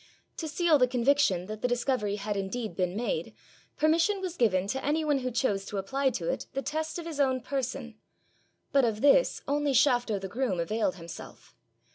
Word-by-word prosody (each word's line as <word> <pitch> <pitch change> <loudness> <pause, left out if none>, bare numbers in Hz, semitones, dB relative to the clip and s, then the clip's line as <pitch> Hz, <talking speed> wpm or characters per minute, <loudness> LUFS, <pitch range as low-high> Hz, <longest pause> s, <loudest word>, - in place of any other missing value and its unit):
To 320 - -3
seal 315 0 +3
the 250 - +5
conviction 250 -7 +2
that 215 +2 -7
the - - +2
discovery 245 -4 0
had 205 0 -3
indeed 205 +4 -3
been 180 -1 -1
made, 245 - -2 0.4
permission 330 +6 +3
was 370 -2 -4
given 195 - +2
to 265 +4 -2
any 310 +2 0
one 290 -2 +2
who 255 -1 -2
chose 225 -5 0
to 205 - -5
apply 265 +8 0
to 165 - -5
it - - -2
the 270 - -2
test 315 +2 -3
of 340 - -6
his 320 -3 -6
own 260 -2 +2
person, 255 -3 -4 0.7
but 275 -1 +4
of 225 -2 0
this 290 - +4
only 290 0 +1
Shafto 245 -5 +3
the 190 - -5
groom 205 -3 -1
availed 200 +3 0
himself. 165 -2 -11
250 Hz, 190 wpm, -29 LUFS, 210-285 Hz, 0.7 s, the